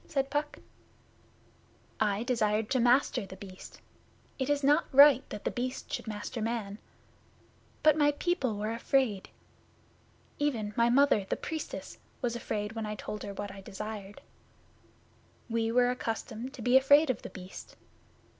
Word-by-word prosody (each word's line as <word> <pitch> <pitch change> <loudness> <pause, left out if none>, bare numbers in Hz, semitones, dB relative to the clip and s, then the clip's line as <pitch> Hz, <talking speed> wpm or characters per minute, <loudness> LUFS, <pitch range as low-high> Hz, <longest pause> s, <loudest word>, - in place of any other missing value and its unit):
said 275 -2 -1
Puck. 295 +1 -2 1.4
'I 210 0 +1
desired 220 -3 0
to 260 - +2
master 245 0 +3
The 190 -1 -9
Beast. 190 -1 -11 0.6
It 265 +1 -1
is 290 -1 +1
not 295 +4 +3
right 280 -1 +8
that 210 - -7
The - - -1
Beast 255 +2 -4
should - - -4
master 215 +2 -5
man. 215 -2 -3 1.0
But 310 -2 +6
my 290 0 +5
people 290 - -1
were 215 +2 -2
afraid. 230 -3 0 1.1
Even, 230 -8 -1
my 235 0 +3
Mother, 255 -5 +4
the - - 0
Priestess, 320 -1 -6 0.2
was 240 -2 -1
afraid 210 -2 -3
when 225 -1 -4
I 210 - -4
told 210 0 -6
her 200 -1 -6
what 205 0 -5
I 195 0 -10
desired. 205 0 -7 1.3
We 225 0 0
were 245 +1 +4
accustomed 240 +1 -4
to 235 - -8
be 250 +3 +6
afraid 285 +2 +5
of 245 - -6
The - - -8
Beast. 185 -1 -10
235 Hz, 150 wpm, -30 LUFS, 210-270 Hz, 1.4 s, right